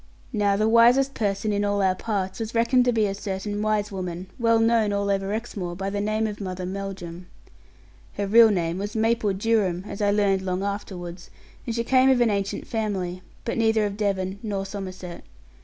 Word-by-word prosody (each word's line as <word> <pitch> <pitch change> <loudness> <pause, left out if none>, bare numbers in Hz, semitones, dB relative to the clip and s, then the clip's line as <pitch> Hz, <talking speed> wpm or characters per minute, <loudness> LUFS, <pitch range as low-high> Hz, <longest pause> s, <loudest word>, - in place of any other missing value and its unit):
Now 205 -2 +2
the 215 +2 +2
wisest 240 +4 +5
person 205 0 -1
in 205 0 0
all 205 0 0
our 190 -1 +3
parts 190 -1 -3
was 225 +1 -4
reckoned 245 +2 +3
to 245 - +3
be 220 -2 +2
a 195 - -1
certain 205 +1 -4
wise 215 -1 0
woman, 185 -1 -5
well 230 -1 +4
known 225 -2 +3
all 200 0 0
over 195 0 -1
Exmoor 205 -6 -4
by 195 +2 -3
the 200 0 -2
name 215 +1 0
of 210 -1 -4
Mother 185 -1 -4
Melldrum. 185 -2 -6 0.9
Her 205 - -2
real 225 +3 +7
name 175 -3 -1
was 205 +2 -4
Maple 225 -1 +2
Durham, 195 -3 +1
as 200 - -6
I 205 - +3
learned 200 -2 +2
long 185 0 -2
afterwards; 185 -3 -5 0.4
and 230 - -2
she 235 - 0
came 260 +2 +4
of 260 -2 +4
an 235 -2 +3
ancient 200 -1 -2
family, 190 -5 -3 0.2
but 230 - -2
neither 220 -1 +3
of 200 -1 -3
Devon 195 -2 -1
nor 200 -3 -3
Somerset. 185 -3 -7
205 Hz, 195 wpm, -25 LUFS, 190-220 Hz, 0.9 s, real